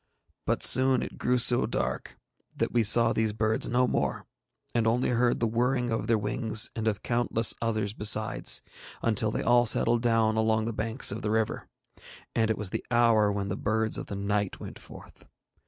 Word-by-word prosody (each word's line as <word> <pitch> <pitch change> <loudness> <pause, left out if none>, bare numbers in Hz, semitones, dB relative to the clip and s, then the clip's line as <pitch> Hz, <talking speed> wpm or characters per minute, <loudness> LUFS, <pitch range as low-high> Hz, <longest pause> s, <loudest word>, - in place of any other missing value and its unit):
But - - 0
soon 130 0 +4
it - - -8
grew 125 +1 +1
so 120 0 +4
dark - - -4 0.4
that - - -1
we 120 - +2
saw 115 +2 +4
these 110 -1 0
birds 110 0 -1
no 125 +1 +2
more, - - -2 0.5
and 115 -2 +1
only 120 +3 +1
heard 120 0 +1
the 115 - +1
whirring 120 +2 0
of 115 - -2
their 115 - +3
wings, 110 +1 -1
and 110 0 -3
of 105 -2 -2
countless 120 -2 0
others 110 -3 -2
besides, 110 0 -1 0.4
until 110 -1 0
they - - -3
all 120 -1 +3
settled 115 +2 +1
down 115 -2 +1
along 110 0 +1
the 115 - -3
banks 110 +4 +1
of - - -5
the 105 - -3
river, 110 0 -1 0.7
and 110 -1 +1
it 110 - 0
was 100 -3 -4
the - - -4
hour 115 -3 +3
when 100 -1 -3
the 100 - -2
birds 110 +1 -1
of - - -7
the 100 - -6
night 100 0 -2
went - - -9
forth. - - -14
110 Hz, 190 wpm, -27 LUFS, 110-120 Hz, 0.7 s, soon